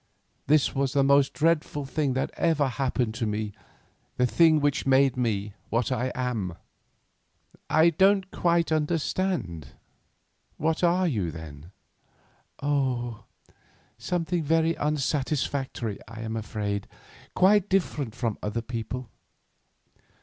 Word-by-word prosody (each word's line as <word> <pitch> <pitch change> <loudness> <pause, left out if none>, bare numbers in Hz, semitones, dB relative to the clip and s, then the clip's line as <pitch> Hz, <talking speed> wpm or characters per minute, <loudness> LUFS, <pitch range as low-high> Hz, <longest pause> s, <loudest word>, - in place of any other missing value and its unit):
This 150 -1 +3
was 135 0 0
the 140 -1 +3
most 140 0 +4
dreadful 155 -2 0
thing 140 -1 -1
that 130 - -1
ever 155 -4 +2
happened 125 -3 -1
to 115 0 -2
me, 105 0 -3 0.6
the 125 - +3
thing 160 +4 +4
which 145 -2 0
made 135 -1 +4
me 105 -5 -1 0.2
what 115 +2 0
I 130 0 0
am." 115 -9 -2 1.1
"I 160 +2 +5
don't 190 +3 +3
quite 170 -1 +1
understand. 155 - -1 0.8
What 160 +3 0
are 180 +2 +3
you, 105 - -1
then?" 80 -1 -9 0.9
"Oh, 130 -5 -1 0.7
something 175 +5 -1
very 165 +2 +2
unsatisfactory, 140 -5 -1
I 115 +1 -9
am 110 0 -4
afraid, 105 -2 -3 0.5
quite 205 +1 +4
different 150 - 0
from 115 -4 -2
other 110 +2 -3
people. 120 +1 -5
135 Hz, 115 wpm, -26 LUFS, 115-160 Hz, 1.1 s, I